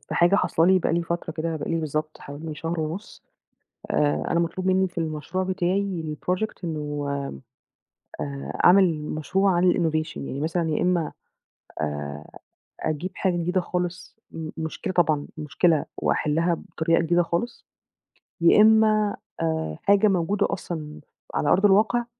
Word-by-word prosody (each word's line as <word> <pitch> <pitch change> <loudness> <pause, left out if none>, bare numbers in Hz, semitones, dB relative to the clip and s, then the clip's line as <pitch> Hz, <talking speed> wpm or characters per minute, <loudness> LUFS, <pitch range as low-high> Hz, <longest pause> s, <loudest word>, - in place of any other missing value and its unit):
في - - -7
حاجة 175 +3 +4
حاصلة 170 -3 +2
لي 190 0 +5
بقى - - 0
لي 170 +1 +1
فترة 170 +1 -3
كده، 160 0 -2
بقى 150 - -5
لي 165 - +1
بالضبط 155 0 -3
حوالي 150 +2 -7
شهر 165 +2 -3
ونُص، 165 +7 -6 0.7
آآ 145 -1 +1
أنا 170 - +2
مطلوب 170 +2 -2
مِنّي 190 0 +3
في 175 - -8
المشروع 160 +3 -2
بتاعي 185 -1 -1 0.2
الproject 185 +4 0
إنه 150 -3 -3 1.1
آآ 140 -1 -5
أعمِل 185 -2 +6
مشروع 170 +6 0
عن 175 +1 +4
الinnovation 160 -2 -1
يعني 135 0 -5
مثلًا 165 +1 0
يا 150 - 0
إمّا 175 -3 +1 0.7
آآ 75 0 -5 0.4
أجيب 155 +4 -2
حاجة 185 -3 0
جديدة 180 +2 0
خالص 180 0 -4
م 160 -1 -6
مشكلة 160 +5 -4
طبعًا، 155 -5 +2
مشكلة 155 +1 +2
وأحِلها 165 +3 +1
بطريقة 165 0 0
جديدة 170 +1 +3
خالص، 170 +8 -3 0.8
يا 170 +5 +6
إمّا 215 -1 +4 0.3
آآ 160 - -1
حاجة 200 +1 +5
موجودة 190 +1 +1
أصلًا 155 -5 -5 0.3
على 145 - 0
أرض 195 +3 +4
الواقع، 215 +4 +4
170 Hz, 145 wpm, -25 LUFS, 155-185 Hz, 1.1 s, أعمِل